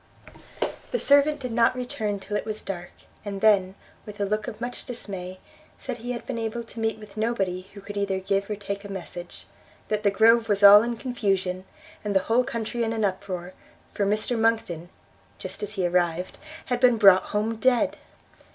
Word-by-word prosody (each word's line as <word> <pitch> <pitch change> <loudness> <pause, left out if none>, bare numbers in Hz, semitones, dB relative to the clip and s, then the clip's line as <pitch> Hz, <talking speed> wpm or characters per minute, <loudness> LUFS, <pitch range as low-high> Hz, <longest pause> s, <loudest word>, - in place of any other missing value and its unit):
The - - 0
servant 285 -3 +4
did 250 -2 -4
not 230 +1 +3
return 220 -5 -3
till 195 +2 -5
it - - 0
was 215 -1 -4
dark; 175 -2 -6 0.3
and 200 -1 -5
then, 195 -3 +4 0.3
with 210 -1 -10
a 200 - +1
look 215 +2 -1
of - - -6
much 240 +1 -5
dismay, 190 -7 -6 0.4
said 255 -3 -6
he 245 +2 -5
had 235 - -7
been 250 -3 -4
able 225 +1 -3
to 230 0 -10
meet 225 0 0
with 210 -1 -13
nobody 195 -5 -1
who 200 - -9
could 205 +1 -8
either 200 -1 0
give 195 +1 -1
or 210 - -1
take 200 0 -5
a 200 - -9
message; 175 -2 -8 0.4
that 215 -1 0
the 205 - +3
Grove 225 +3 +4
was 205 0 +2
all 205 +1 +11
in 235 +1 -2
confusion, 195 -7 -1 0.4
and 205 -1 -2
the 190 - +5
whole 235 +3 +2
country 230 0 -3
in 225 0 -1
an 220 -2 0
uproar, 185 -2 -4 0.4
for 200 - 0
Mr 215 +4 +1
Monckton, 220 -7 0 0.5
just - - -6
as 210 0 -3
he 190 -3 -1
arrived, 175 0 0 0.3
had 245 -1 -1
been 245 -2 +5
brought 195 -3 +7
home 215 +2 -1
dead! 245 +1 +2
210 Hz, 195 wpm, -25 LUFS, 195-230 Hz, 0.5 s, all